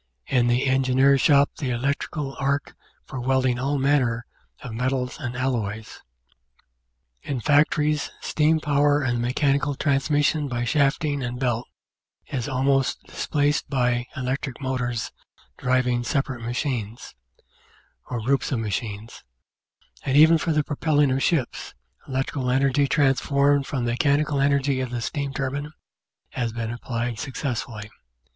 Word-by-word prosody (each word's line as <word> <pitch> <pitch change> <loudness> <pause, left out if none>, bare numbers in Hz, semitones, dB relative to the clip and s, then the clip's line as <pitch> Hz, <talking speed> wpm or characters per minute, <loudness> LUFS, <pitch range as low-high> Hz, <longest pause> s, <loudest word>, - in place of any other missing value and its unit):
in 120 -2 +2
the 120 +2 +2
Engineer's 135 +1 +3
shop 140 -1 +5
the 135 - -2
electric 135 +5 -2
arc 140 -1 -2 0.3
for 130 - -6
welding 130 -1 +1
all 140 +3 0
manner 130 -4 +1 0.4
of 125 -4 -6
metals 125 +3 -2
and 120 -5 -4
alloys. 110 -5 -3 1.2
In 135 -3 -3
factories 150 +2 +2
steam 160 +1 +2
power 145 0 +2
and 120 -2 0
the - - -2
mechanical 140 +3 +1
transmission 145 +2 +1
by 120 -2 -2
shafting 145 +2 +1
and 125 -1 -4
belt 120 -2 -1 0.6
is 130 -1 -4
almost 135 0 +1
displaced 145 0 -1
by 125 -2 0
electric 130 0 -3
motors 125 -4 -2 0.5
driving 125 -1 +1
separate 135 -1 -2
machines, 120 -2 -3 1.0
or 120 -2 -3
groups 135 +6 0
of 130 - +1
machines; 110 0 -4 0.8
and 135 +1 +1
even 160 +2 +7
for 165 - -1
the 150 -1 +2
propelling 145 -1 +1
of 135 +1 0
ships, 140 -7 -1 0.3
electric 135 +1 -2
energy 135 +2 +2
transformed 140 0 +2
from 130 -4 -2
the 120 - 0
mechanical 145 +3 +1
energy 140 -1 +2
of 130 - -3
the 120 0 -3
steam 140 +3 -3
turbine 140 +2 -3 0.6
has 115 -2 -2
been 115 0 -4
applied 120 -1 -3
success 130 -1 -3
fully. 105 -2 -9
135 Hz, 135 wpm, -24 LUFS, 120-145 Hz, 1.2 s, even